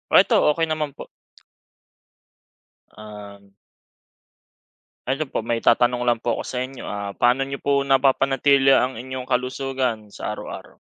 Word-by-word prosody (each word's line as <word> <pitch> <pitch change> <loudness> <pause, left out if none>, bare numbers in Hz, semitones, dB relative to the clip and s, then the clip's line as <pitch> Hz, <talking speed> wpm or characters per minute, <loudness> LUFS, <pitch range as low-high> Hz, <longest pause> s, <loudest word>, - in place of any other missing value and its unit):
Ito - - +6 0.2
okey 165 -1 -1
naman 150 -2 -2
po. - - -10 1.9
Um. 100 -2 -12 1.6
Ano 135 +4 0
po 140 - -4
may 115 +1 -2
itatanong 120 +1 +3
lang 120 -2 +1
po 120 0 -1
ako - - -5
sa 125 - -4
inyo, 135 -1 -11
ah, 100 -1 -5
paano 125 +3 +2
niyo 140 0 -7
po 140 0 +2
napapanatili 135 0 +3
ang 125 -2 0
inyong 130 +1 -6
kalusugan 125 -4 -2
sa - - -5
araw-araw? - - -9
130 Hz, 130 wpm, -22 LUFS, 115-135 Hz, 1.9 s, Ito